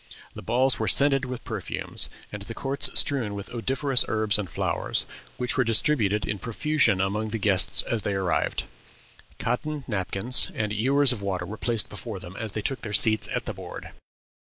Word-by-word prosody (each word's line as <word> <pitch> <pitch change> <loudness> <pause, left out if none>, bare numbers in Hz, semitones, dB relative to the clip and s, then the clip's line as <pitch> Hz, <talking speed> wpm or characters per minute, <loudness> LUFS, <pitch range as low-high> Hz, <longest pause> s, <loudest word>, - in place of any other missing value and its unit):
The - - -9
balls 125 +3 +1
were - - -1
scented 140 -1 +4
with 125 -1 -6
perfumes, 110 -6 -3 0.2
and 105 - -6
the 115 +3 -7
courts 135 +1 0
strewed 120 -8 +2
with 100 -1 -7
odoriferous 130 +2 +2
herbs 110 -1 +2
and 95 -4 -4
flowers, - - -2 0.3
which 125 -1 -2
were 130 - +3
distributed 110 -3 +2
in 105 -1 -3
profusion 125 -2 +1
among 105 +3 -1
the 115 - -3
guests 95 -4 +3
as 115 -2 -1
they 100 -1 -2
arrived. 95 -3 -1 0.7
Cotton 145 +5 -3
napkins 105 +3 +1
and 105 -1 -2
ewers 135 +5 +3
of 115 -5 -4
water 95 -3 -3
were 105 - -7
placed 115 -2 0
before 105 -1 -7
them 95 0 -11
as 110 -3 -3
they 110 - -4
took 135 -2 -2
their 105 -3 -6
seats 110 0 +5
at - - -2
the - - -4
board. - - -9
110 Hz, 180 wpm, -25 LUFS, 100-130 Hz, 0.7 s, seats